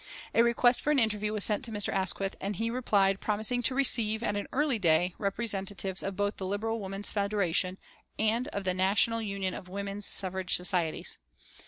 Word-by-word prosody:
A 230 - +5
request 240 +1 +3
for - - -2
an 300 - +3
interview 210 -3 +1
was 215 -2 +1
sent 210 +1 +1
to 230 - -2
Mr. 205 -2 0
Asquith, 195 0 0
and 200 +1 -3
he 230 +4 -2
replied 200 -6 +2
promising 215 +4 0
to 255 +2 0
receive, 230 -5 +3
at 205 -3 0
an 205 - -3
early 280 -4 +1
day, 175 0 +3
representatives 195 -2 -2
of 195 0 -4
both 205 +1 -1
the 190 - -4
Liberal 225 +3 -2
Women's 195 0 -5
Federation 195 -3 0 0.4
and 225 +3 +1
of 200 - -4
the 185 -1 0
National 200 +5 +2
Union 195 -3 -2
of 180 - -8
Women's 200 +1 -4
Suffrage 190 -1 -1
Societies. 180 -3 -1
205 Hz, 185 wpm, -29 LUFS, 190-225 Hz, 0.4 s, A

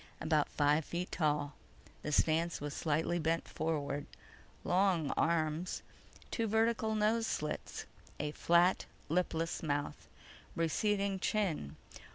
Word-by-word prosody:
About 155 -2 +2
five 150 +2 +3
feet 175 +4 -4
tall. 150 -3 0 0.5
The 150 - -3
stance 165 +3 +2
was 145 0 -4
slightly 160 +2 0
bent 165 +1 0
forward, 145 -3 -2 0.6
long 180 -4 +2
arms. 160 +1 0 0.5
Two 230 -2 0
vertical 220 0 +2
nose 220 +2 +2
slits. 150 0 -3 0.3
A 150 0 -1
flat, 175 +4 +3 0.2
lipless 165 0 0
mouth. 145 -2 -2 0.5
Receding 195 +4 +1
chin. 180 - -1
165 Hz, 110 wpm, -34 LUFS, 150-190 Hz, 0.6 s, five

